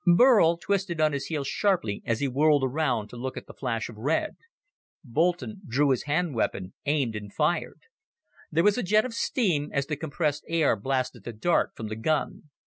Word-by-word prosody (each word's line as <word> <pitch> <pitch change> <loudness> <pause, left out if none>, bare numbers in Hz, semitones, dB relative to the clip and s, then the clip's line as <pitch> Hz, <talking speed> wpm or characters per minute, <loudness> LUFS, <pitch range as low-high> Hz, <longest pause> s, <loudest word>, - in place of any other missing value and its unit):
Burl 205 -8 +6
twisted 190 -2 -1
on 155 -1 +3
his 140 -1 -3
heel 155 -4 -2
sharply 155 - 0
as 115 +1 0
he 140 - +1
whirled 145 +2 +3
around 130 -5 0
to - - -11
look 130 +2 -5
at - - -7
the - - -12
flash 115 -4 -3
of 115 - -11
red. 140 +9 -1 0.7
Boulton 175 - -1
drew 140 +4 +2
his 130 - 0
hand 155 +2 0
weapon, 95 -5 -2
aimed 140 -7 +1
and 105 -1 -6
fired. - - -1 0.7
There 165 +2 +2
was 210 +4 +3
a - - -1
jet 215 +4 +3
of 255 - -5
steam 180 - 0
as 140 -1 0
the 150 - -3
compressed 150 0 -2
air 165 -6 +2
blasted 130 0 -2
the 120 - -6
dart 170 +11 +1
from 110 - -6
the 110 - -4
gun. 150 +5 -2
145 Hz, 195 wpm, -27 LUFS, 125-170 Hz, 0.7 s, Burl